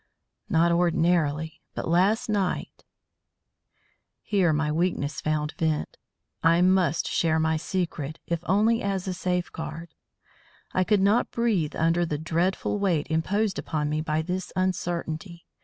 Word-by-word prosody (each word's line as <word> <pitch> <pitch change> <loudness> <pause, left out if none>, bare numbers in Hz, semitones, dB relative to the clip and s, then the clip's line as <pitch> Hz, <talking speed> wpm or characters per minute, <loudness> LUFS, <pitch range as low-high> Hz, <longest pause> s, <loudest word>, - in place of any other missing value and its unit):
"Not 170 -2 +3
ordinarily. 165 -3 +1
But - - -3
last 190 +7 +2
night 200 -4 -2 0.6
" - - -45
Here 190 -5 +2
my 150 0 0
weakness 155 -3 -1
found 155 -1 -1
vent. 160 -2 -1 0.5
I 165 +1 +4
must 185 -3 +2
share 160 -1 +1
my 160 0 +2
secret, 160 -3 -3
if 170 -1 -1
only 220 +4 +3
as 195 -2 -2
a 185 - -1
safeguard; 170 -3 -4 0.8
I 185 - +3
could 205 0 +2
not 205 +5 +3
breathe 215 -10 0
under 165 +2 +2
the 155 -3 -2
dreadful 170 +6 -1
weight 175 -7 +1
imposed 195 +5 0
upon 150 -2 -2
me 155 0 0
by 155 0 -1
this 180 +2 -4
uncertainty. 175 -1 -2
170 Hz, 135 wpm, -26 LUFS, 160-185 Hz, 0.8 s, I